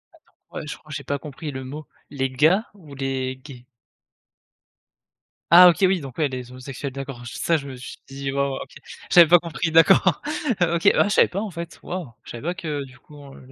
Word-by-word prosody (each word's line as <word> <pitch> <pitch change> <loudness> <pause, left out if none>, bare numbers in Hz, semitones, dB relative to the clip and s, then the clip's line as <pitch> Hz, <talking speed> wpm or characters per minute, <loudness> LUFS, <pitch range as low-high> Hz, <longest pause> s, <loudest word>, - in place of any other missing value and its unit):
Attends. - - -28 0.2
Ouais, - - -7
je - - -6
crois 155 - -22
que - - -5
j'ai - - -5
pas 140 - -2
compris 150 +1 -8
le 130 -1 -6
mot. 145 +4 -8 0.2
Les 135 -2 -2
gars, 160 - +2
ou 160 -8 -14
les 130 -1 -3
gays? 130 -2 -13 1.9
Ah 180 +2 +10
OK. 170 - +1
Oui 185 0 +1
donc, 135 -3 -10
ouais, 155 - +2
les 125 -1 -7
homosexuels. 130 +2 -7
D'accord. 135 -2 -7
Je 120 - -8
ça 165 - +1
je 140 -2 -8
me 135 - -8
suis 125 +1 -10
dit 135 0 -5
waouh, 140 0 -1
OK. - - -10 0.4
J'avais 170 -2 +8
pas 175 +2 +7
compris. 165 0 -3
D'accord, 165 +2 +5 0.4
heu, 170 -1 +2
OK. 170 +4 +4
Ah - - +5
je - - 0
savais - - +5
pas 195 - -4
en 215 -2 -5
fait, 170 0 -8
waouh, 175 -8 -6
je - - -11
savais 120 - -8
pas 175 +3 -1
que 155 -6 -4
du 130 -1 -16
coup 150 - -18 0.2
elle 130 0 -15
145 Hz, 225 wpm, -23 LUFS, 130-170 Hz, 1.9 s, Ah